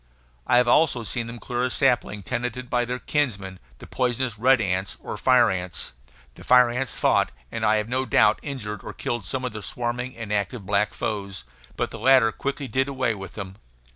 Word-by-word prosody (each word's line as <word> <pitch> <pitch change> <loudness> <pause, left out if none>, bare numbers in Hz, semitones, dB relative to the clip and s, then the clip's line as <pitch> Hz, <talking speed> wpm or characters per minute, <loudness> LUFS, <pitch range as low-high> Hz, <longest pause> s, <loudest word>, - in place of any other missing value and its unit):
I - - +5
have 125 0 +4
also 130 -2 +3
seen 115 +1 -3
them 115 +1 -7
clear 120 +2 -3
a 130 - +1
sapling 120 -6 +1
tenanted 125 +2 -4
by 120 0 +2
their 125 +1 -3
kinsmen, 100 -11 -2 0.2
the - - -12
poisonous 125 -3 -1
red 130 +2 +5
ants, 95 -2 -1
or - - -6
fire 125 -4 +4
ants; 90 -6 -3 0.4
the - - -14
fire 125 -1 +6
ants 125 0 -3
fought - - +2 0.2
and - - -4
I 110 - +4
have 105 0 0
no 130 +2 -1
doubt 105 - +4
injured 105 -8 -5
or - - -7
killed 120 -5 -3
some 130 +7 -2
of 125 - -2
their 110 - -6
swarming 125 +4 -3
and 110 -2 -4
active 100 +1 -2
black 100 +2 +1
foes; 100 -5 -4 0.3
but - - -1
the - - -8
latter 125 -1 +5
quickly 140 +3 -4
did 130 +1 0
away 130 -4 0
with 95 -2 -8
them. 95 -2 -7
120 Hz, 200 wpm, -24 LUFS, 105-130 Hz, 0.4 s, fire